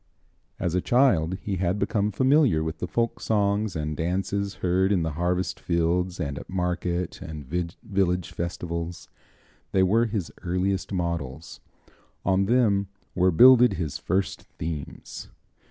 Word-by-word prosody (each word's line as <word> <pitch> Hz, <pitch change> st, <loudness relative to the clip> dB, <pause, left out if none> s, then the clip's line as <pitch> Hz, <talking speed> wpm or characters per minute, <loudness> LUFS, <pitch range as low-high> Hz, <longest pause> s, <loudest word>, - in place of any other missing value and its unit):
As 90 Hz, -3 st, -1 dB
a 90 Hz, -, +1 dB
child 95 Hz, -10 st, +3 dB
he 100 Hz, -2 st, -2 dB
had 90 Hz, +2 st, 0 dB
become 105 Hz, 0 st, 0 dB
familiar 130 Hz, -, +3 dB
with 80 Hz, +1 st, -4 dB
the 90 Hz, -, -3 dB
folk 115 Hz, +5 st, -1 dB
songs 105 Hz, -2 st, 0 dB
and 75 Hz, -1 st, -2 dB
dances 95 Hz, +4 st, -2 dB
heard 95 Hz, +2 st, +1 dB
in 90 Hz, -5 st, +2 dB
the 80 Hz, -, -1 dB
harvest 90 Hz, +3 st, -1 dB
fields 90 Hz, +2 st, 0 dB
and 70 Hz, -4 st, -3 dB
at -, -, -12 dB
market 90 Hz, -1 st, -2 dB
and 75 Hz, -3 st, -7 dB
village 90 Hz, -, -1 dB
festivals. 85 Hz, 0 st, -4 dB, 0.6 s
They 95 Hz, -, +4 dB
were 115 Hz, +5 st, +3 dB
his 105 Hz, -6 st, -3 dB
earliest 90 Hz, +2 st, -1 dB
models; 85 Hz, -5 st, -3 dB, 0.7 s
on 95 Hz, +1 st, +3 dB
them 105 Hz, -5 st, +3 dB, 0.3 s
were 90 Hz, +1 st, +3 dB
builded 125 Hz, +5 st, +7 dB
his 80 Hz, -4 st, -3 dB
first 95 Hz, +1 st, -1 dB, 0.2 s
themes. 75 Hz, -3 st, -6 dB
90 Hz, 140 wpm, -26 LUFS, 85-100 Hz, 0.7 s, builded